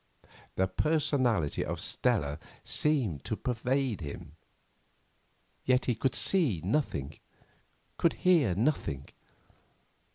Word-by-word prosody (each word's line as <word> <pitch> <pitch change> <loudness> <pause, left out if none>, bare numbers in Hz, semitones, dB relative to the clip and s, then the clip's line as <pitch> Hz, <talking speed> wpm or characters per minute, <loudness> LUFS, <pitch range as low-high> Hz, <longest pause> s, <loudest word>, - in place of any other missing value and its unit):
The 95 - +2
personality 125 - +1
of - - -4
Stella 70 0 0 0.2
seemed 125 - 0
to 110 - -2
pervade 125 -1 -1
him, 75 +1 -8 1.3
yet 130 0 +2
he 125 - +1
could 120 +3 -1
see 155 - +4
nothing, 90 - -2 0.8
could 170 - +3
hear 160 - +3
nothing. 100 - -1
120 Hz, 95 wpm, -30 LUFS, 85-140 Hz, 1.3 s, see